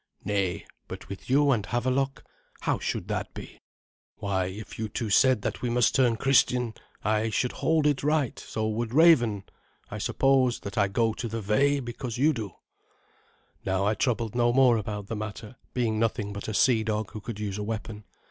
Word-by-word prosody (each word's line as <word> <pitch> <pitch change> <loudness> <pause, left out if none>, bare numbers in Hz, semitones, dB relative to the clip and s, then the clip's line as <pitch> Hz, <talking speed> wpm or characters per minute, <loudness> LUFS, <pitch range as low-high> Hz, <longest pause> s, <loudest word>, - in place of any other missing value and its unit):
"Nay, 100 -4 -1 0.2
but - - -9
with 100 +4 -8
you 140 +2 +4
and 110 -6 +1
Havelok? 130 +5 -1 0.4
How - - 0
should - - -3
that - - -2
be? - - -10 0.5
Why, 95 -2 -1
if 100 +4 -8
you 110 -1 -2
two 110 0 -3
said 130 -2 +4
that - - -3
we 125 - -1
must 120 0 +3
turn 125 -4 +3
Christian, 125 -3 +2 0.3
I 110 +1 +1
should 125 +3 0
hold 160 -2 +1
it 145 -3 +2
right; 150 -4 0
so 110 0 -3
would 115 +2 -2
Raven. 120 - +5 0.5
I - - -5
suppose 130 -2 +2
that 100 +1 -7
I 100 -3 +3
go 110 +3 +1
to 120 - -4
the 115 +1 -4
Ve 140 +7 +2
because 120 -1 -5
you 150 +5 +3
do." 110 -8 -6 1.1
Now 95 0 0
I 105 - +2
troubled 115 0 -1
no 120 -1 +3
more 125 -2 +5
about 105 -1 -4
the 110 - -5
matter, 110 +2 -7 0.2
being 115 -3 0
nothing 110 -2 -1
but 100 - -6
a 110 - -3
sea 115 -1 +4
dog 110 -2 -2
who 110 - -7
could 110 0 -6
use 105 -1 -3
a - - -2
weapon. 110 0 -5
115 Hz, 190 wpm, -27 LUFS, 105-125 Hz, 1.1 s, Raven